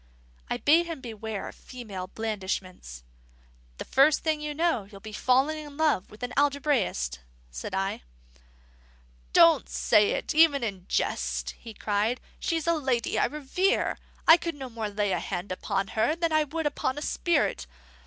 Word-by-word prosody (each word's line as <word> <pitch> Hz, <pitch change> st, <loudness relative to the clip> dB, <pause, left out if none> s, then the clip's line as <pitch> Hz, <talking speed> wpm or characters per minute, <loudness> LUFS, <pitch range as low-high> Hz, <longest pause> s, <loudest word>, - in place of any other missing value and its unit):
I -, -, -1 dB
bade 330 Hz, +4 st, +4 dB
him 330 Hz, -4 st, -5 dB
beware 220 Hz, -4 st, -6 dB
of -, -, -8 dB
female 210 Hz, -8 st, -8 dB
blandishments. 190 Hz, -, -5 dB, 0.7 s
"The -, -, -6 dB
first 280 Hz, +3 st, +4 dB
thing 310 Hz, -2 st, 0 dB
you 300 Hz, 0 st, -4 dB
know, 325 Hz, -, +1 dB
you'll 200 Hz, 0 st, -13 dB
be 215 Hz, +2 st, -10 dB
falling 265 Hz, +7 st, +2 dB
in 290 Hz, -1 st, -11 dB
love 305 Hz, -12 st, +1 dB
with 210 Hz, -, -15 dB
the 245 Hz, -, -2 dB
algebraist," 275 Hz, -, +1 dB, 0.3 s
said -, -, -5 dB
I. 195 Hz, 0 st, -1 dB, 1.3 s
"Don't 60 Hz, -, +5 dB
say 65 Hz, -, +3 dB
it -, -, -2 dB
even 305 Hz, -4 st, +5 dB
in 195 Hz, -5 st, -4 dB
jest," -, -, -1 dB
he 225 Hz, -2 st, -12 dB
cried. 215 Hz, +5 st, 0 dB, 0.2 s
"She's 330 Hz, -3 st, -1 dB
a 335 Hz, -, +3 dB
lady 260 Hz, -7 st, 0 dB
I -, -, +4 dB
revere. 300 Hz, -, 0 dB, 0.3 s
I 325 Hz, -, +10 dB
could 335 Hz, -2 st, -4 dB
no 265 Hz, -3 st, -7 dB
more 225 Hz, -2 st, -3 dB
lay 205 Hz, -1 st, -1 dB
a -, -, +1 dB
hand 185 Hz, 0 st, -4 dB
upon 195 Hz, +1 st, -2 dB
her 220 Hz, +9 st, +1 dB
than 335 Hz, -1 st, -1 dB
I 310 Hz, -1 st, +3 dB
could 320 Hz, +2 st, -4 dB
upon 290 Hz, -2 st, -1 dB
a -, -, -4 dB
spirit. 345 Hz, +1 st, 0 dB
250 Hz, 165 wpm, -27 LUFS, 200-300 Hz, 1.3 s, I